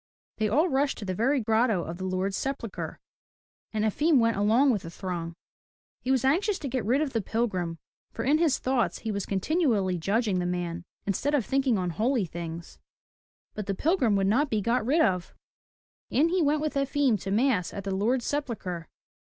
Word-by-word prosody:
They 215 Hz, -1 st, +1 dB
all 300 Hz, -, +3 dB
rushed 275 Hz, -2 st, +1 dB
to 205 Hz, -, -6 dB
the 185 Hz, -, -2 dB
very 265 Hz, +9 st, +2 dB
grotto 220 Hz, -4 st, +2 dB
of 170 Hz, +2 st, -6 dB
the 190 Hz, -, -3 dB
Lord's 190 Hz, +1 st, -1 dB
sepulchre, 265 Hz, -5 st, -4 dB, 0.7 s
and 215 Hz, -1 st, 0 dB
Efim 295 Hz, +8 st, +3 dB
went 230 Hz, -1 st, +3 dB
along 225 Hz, +7 st, +4 dB
with 210 Hz, -6 st, 0 dB
the 165 Hz, -, -8 dB
throng. 170 Hz, -2 st, -5 dB, 0.7 s
He 255 Hz, -, -5 dB
was 265 Hz, -1 st, +2 dB
anxious 370 Hz, +9 st, +2 dB
to 295 Hz, -, -5 dB
get 255 Hz, -2 st, -2 dB
rid 250 Hz, +8 st, +2 dB
of 295 Hz, -4 st, -2 dB
the 225 Hz, -, +1 dB
pilgrim, 185 Hz, -6 st, -2 dB, 0.3 s
for 225 Hz, -, -4 dB
in 295 Hz, +4 st, +3 dB
his 325 Hz, -5 st, +3 dB
thoughts 255 Hz, -2 st, 0 dB
he 220 Hz, -, 0 dB
was 200 Hz, -2 st, -3 dB
continually 200 Hz, -, +1 dB
judging 200 Hz, +2 st, +1 dB
the 175 Hz, -, -1 dB
man 175 Hz, -1 st, -3 dB, 0.2 s
instead 270 Hz, +9 st, 0 dB
of 255 Hz, -7 st, +1 dB
thinking 265 Hz, -2 st, +1 dB
on 180 Hz, -2 st, -1 dB
holy 225 Hz, -, +1 dB
things. 170 Hz, 0 st, -7 dB, 0.7 s
But 210 Hz, -2 st, -5 dB
the 195 Hz, -, -1 dB
pilgrim 280 Hz, -, +2 dB
would 195 Hz, -1 st, +2 dB
not 260 Hz, +9 st, +2 dB
be 215 Hz, -, +1 dB
got 230 Hz, +4 st, +1 dB
rid 290 Hz, +8 st, +2 dB
of. 180 Hz, -, 0 dB, 0.7 s
In 305 Hz, +6 st, +3 dB
he 365 Hz, +1 st, +1 dB
went 300 Hz, 0 st, +2 dB
with 305 Hz, -1 st, -1 dB
Efim 275 Hz, -4 st, +1 dB
to 195 Hz, -, -5 dB
mass 215 Hz, -3 st, +2 dB
at 200 Hz, -, -6 dB
the 195 Hz, 0 st, -2 dB
Lord's 235 Hz, +6 st, +1 dB
sepulchre. 210 Hz, -, -3 dB
225 Hz, 195 wpm, -27 LUFS, 190-275 Hz, 0.7 s, along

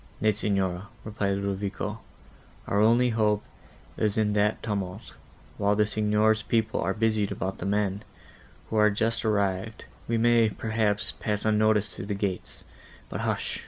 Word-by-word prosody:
"Nay, 110 Hz, +1 st, +3 dB
Signora," 95 Hz, -2 st, -1 dB, 0.2 s
said 105 Hz, -2 st, -1 dB
Ludovico, 100 Hz, +2 st, -3 dB, 0.7 s
"our 100 Hz, -, 0 dB
only 120 Hz, +3 st, +4 dB
hope 105 Hz, -2 st, +1 dB, 0.5 s
is 105 Hz, -1 st, 0 dB
in 105 Hz, -1 st, +2 dB
that 105 Hz, +1 st, +1 dB
tumult; 100 Hz, -2 st, -4 dB, 0.5 s
while 100 Hz, 0 st, +3 dB
the 105 Hz, 0 st, +3 dB
Signor's 110 Hz, +1 st, +2 dB
people 110 Hz, -1 st, 0 dB
are 95 Hz, +2 st, 0 dB
busied 110 Hz, -2 st, +1 dB
about 95 Hz, +2 st, -3 dB
the 95 Hz, -, -3 dB
men, 100 Hz, -1 st, 0 dB, 0.7 s
who 110 Hz, -, 0 dB
are 105 Hz, 0 st, +6 dB
just 110 Hz, +3 st, 0 dB
arrived, 100 Hz, 0 st, -1 dB, 0.2 s
we 115 Hz, -, +1 dB
may, 115 Hz, -1 st, +4 dB
perhaps, 110 Hz, -1 st, -1 dB
pass 105 Hz, -1 st, -2 dB
unnoticed 110 Hz, -1 st, +3 dB
through 95 Hz, -, -6 dB
the 105 Hz, -, -2 dB
gates. 100 Hz, -2 st, -4 dB, 0.5 s
But -, -, -4 dB
hush!" -, -, -2 dB
105 Hz, 150 wpm, -27 LUFS, 100-110 Hz, 0.7 s, are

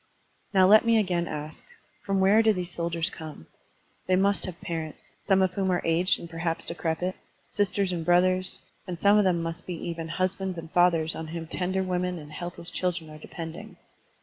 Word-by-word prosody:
Now 190 Hz, -2 st, +5 dB
let 215 Hz, +3 st, +7 dB
me 230 Hz, -1 st, +4 dB
again 180 Hz, -5 st, +1 dB
ask: 150 Hz, +1 st, -6 dB, 0.4 s
From 195 Hz, -1 st, 0 dB
where 200 Hz, +4 st, +5 dB
do 220 Hz, -1 st, +4 dB
these 180 Hz, -2 st, -4 dB
soldiers 170 Hz, 0 st, -1 dB
come? 155 Hz, -, -9 dB, 0.6 s
They 185 Hz, -, +4 dB
must 200 Hz, +1 st, +2 dB
have 180 Hz, -2 st, -7 dB
parents 160 Hz, -2 st, -5 dB
— -, -, -40 dB
some 195 Hz, -1 st, +3 dB
of 185 Hz, -1 st, +1 dB
whom 190 Hz, -1 st, 0 dB
are 180 Hz, -, 0 dB
aged 165 Hz, +3 st, +2 dB
and 170 Hz, -, -8 dB
perhaps 165 Hz, 0 st, -3 dB
decrepit 170 Hz, +2 st, -2 dB, 0.2 s
— -, -, -39 dB
sisters 200 Hz, -1 st, +1 dB
and 170 Hz, -2 st, -2 dB
brothers, 185 Hz, +2 st, +2 dB, 0.2 s
and 180 Hz, -2 st, -4 dB
some 205 Hz, +4 st, +5 dB
of 205 Hz, -, +3 dB
them 175 Hz, -3 st, +2 dB
must 165 Hz, +2 st, -5 dB
be 180 Hz, -, -3 dB
even 165 Hz, 0 st, -5 dB
husbands 185 Hz, +2 st, -2 dB
and 165 Hz, -1 st, -8 dB
fathers 170 Hz, -3 st, +3 dB
on 160 Hz, -, -6 dB
whom 165 Hz, +1 st, -5 dB
tender 185 Hz, +3 st, -1 dB
women 180 Hz, -1 st, -1 dB
and 150 Hz, -2 st, -10 dB
helpless 175 Hz, +1 st, -6 dB
children 175 Hz, -4 st, -2 dB
are 155 Hz, -, -11 dB
depending. 165 Hz, +1 st, -8 dB
175 Hz, 200 wpm, -27 LUFS, 165-185 Hz, 0.6 s, let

